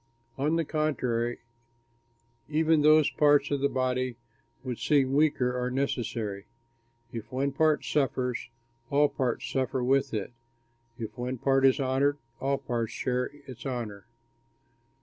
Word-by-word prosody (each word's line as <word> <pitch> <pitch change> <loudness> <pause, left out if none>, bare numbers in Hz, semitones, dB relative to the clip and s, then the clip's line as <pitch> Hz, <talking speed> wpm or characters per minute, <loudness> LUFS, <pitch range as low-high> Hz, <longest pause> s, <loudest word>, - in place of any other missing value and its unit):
On 150 +4 +1
the 165 -1 +1
contrary, 125 -6 -1 1.1
even 155 0 +3
those 155 0 +5
parts 145 -1 +4
of 140 -1 0
the 140 - +3
body 130 -1 -1 0.5
which 125 -3 -4
seem 135 -3 +3
weaker 140 -4 +2
are 125 0 -1
necessary. 115 -6 -2 0.7
If 115 -1 -7
one 135 +2 0
part 155 +2 +2
suffers, 130 -4 -1 0.4
all 145 +1 +4
parts 125 -4 -2
suffer 130 -1 -1
with 135 +2 +2
it. 110 +1 -3 0.6
If 110 -3 -6
one 125 +1 -2
part 135 +2 +4
is 130 - +3
honored, 135 +2 +1 0.2
all 140 +1 0
the - - -17
parts 115 -2 -2
share 125 0 -1 0.2
its 125 -3 -10
honor. 115 -6 -5
130 Hz, 135 wpm, -28 LUFS, 125-140 Hz, 1.1 s, those